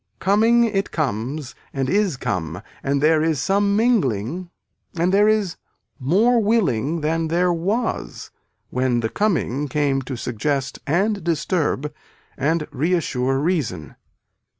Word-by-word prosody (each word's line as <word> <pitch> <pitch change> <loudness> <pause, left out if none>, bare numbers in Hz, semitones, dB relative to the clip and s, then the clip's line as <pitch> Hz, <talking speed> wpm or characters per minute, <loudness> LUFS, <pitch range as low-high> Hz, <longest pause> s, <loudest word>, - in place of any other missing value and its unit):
Coming 225 +4 +4
it 205 -4 0
comes 135 0 -3 0.2
and 135 -1 -2
is 195 -2 +1
come 90 - -3 0.2
and 140 +1 0
there 155 0 +4
is 160 -3 +1
some 200 +4 +2
mingling 175 - +1 0.5
and 175 +3 +1
there 205 +1 +5
is 215 -5 +1 0.4
more 210 - +3
willing 170 - +1
than 160 +2 0
there 175 +2 +2
was 205 +8 -2 0.4
when 125 -2 +1
the 110 - -1
coming 150 - 0
came 140 -1 0
to 130 0 -5
suggest 130 +3 -2
and 195 +5 +1
disturb 155 -3 -1 0.4
and 150 +3 0
reassure 135 -4 0
reason. 140 - -2
160 Hz, 125 wpm, -22 LUFS, 135-195 Hz, 0.5 s, there